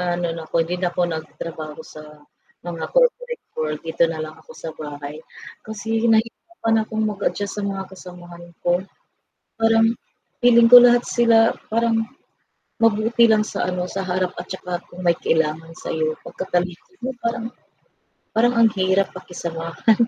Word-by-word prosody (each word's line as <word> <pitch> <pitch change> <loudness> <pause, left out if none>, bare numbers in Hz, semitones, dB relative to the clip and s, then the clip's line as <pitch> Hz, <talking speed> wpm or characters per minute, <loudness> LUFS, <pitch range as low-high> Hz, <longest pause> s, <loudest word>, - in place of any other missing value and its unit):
ano 175 0 -1
'no, 165 - -7
hindi 170 +1 +1
na 180 -1 0
ako 180 - 0
nagtrabaho 160 -1 -6
sa 155 - -9 0.7
mga 165 -2 -4
corporate - - +1
world, 150 -1 -2
dito 165 +1 +1
na 160 -1 -4
lang 155 0 -8
ako - - -15
sa 160 - -4
bahay 145 -1 -7 0.5
kasi 220 +2 -2
nahirapan 225 +1 +1
akong 220 0 -2
mag-adjust 205 0 -2
sa 205 - -2
mga 195 -1 -5
kasamahan 175 -2 -11 0.2
ko. 175 - +3 0.9
Parang 225 0 +4 0.6
feeling 235 -1 +6
ko 245 - +14
lahat 240 0 +4
sila 235 -1 +4 0.3
parang 230 0 +2 0.9
mabuti 225 +2 +3
lang 215 -1 +4
sa 200 - -4
ano, 180 0 -2
sa 195 - -1
harap 180 0 0
at 175 - -7
tsaka 185 -1 -7 0.2
kung 180 +1 -11
may 170 -1 +4
kailangan 160 +1 0
sa'yo, 155 -1 -2
pagkatalikod 180 - -3
mo 260 - -1
parang 230 0 -1 0.9
parang 240 +2 +3
ang 230 -1 +6
hirap 190 +1 +2
pakisamahan. 170 +3 -1
185 Hz, 145 wpm, -22 LUFS, 165-225 Hz, 0.9 s, ko